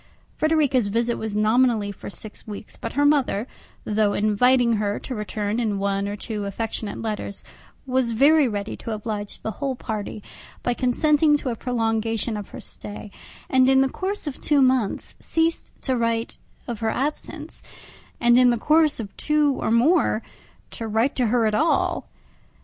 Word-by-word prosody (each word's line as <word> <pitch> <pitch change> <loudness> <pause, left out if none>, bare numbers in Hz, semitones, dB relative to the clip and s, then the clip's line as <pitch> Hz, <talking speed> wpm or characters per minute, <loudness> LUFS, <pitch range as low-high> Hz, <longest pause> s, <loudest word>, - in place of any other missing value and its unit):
Frederica's 295 -7 +2
visit 230 +3 0
was 220 -2 -4
nominally 215 -1 +2
for 200 - -9
six 210 +2 -12
weeks, 210 0 -8
but 230 - -6
her 285 +2 +2
mother, 270 -7 +2 0.4
though 210 -1 +1
inviting 235 +3 +3
her 205 -1 -1
to 260 - -6
return 210 0 -2
in 215 -4 0
one 200 0 -1
or 205 - -3
two 210 0 -5
affectionate 215 +1 -4
letters, 210 -2 -4 0.4
was 260 -2 +1
very 280 +5 +5
ready 205 -2 -3
to - - -8
oblige 210 -1 -4
the 220 - -2
whole 270 -2 -1
party 215 -3 -5 0.4
by 245 - +1
consenting 295 +4 +3
to 275 - -4
a 235 - -2
prolongation 225 -2 -1
of 205 -2 -6
her - - -9
stay, 205 0 -7 0.4
and 260 0 +4
in 265 0 +5
the 270 - +3
course 390 +6 -3
of 290 -3 -6
two 295 -2 +3
months 255 -5 +2
ceased 330 0 0
to 260 - 0
write 230 -1 -1 0.3
of 235 -3 -4
her 225 - 0
absence, 295 +5 -3 0.6
and 240 +1 +5
in 250 -1 +6
the 240 - +2
course 305 +4 +3
of 205 -3 -7
two 300 -2 +2 0.2
more 240 -1 +3 0.5
to 225 - -5
write 225 +5 +1
to 250 -3 +1
her 235 0 +2
at 215 - +1
all. 315 +9 +1
230 Hz, 165 wpm, -23 LUFS, 215-265 Hz, 0.6 s, in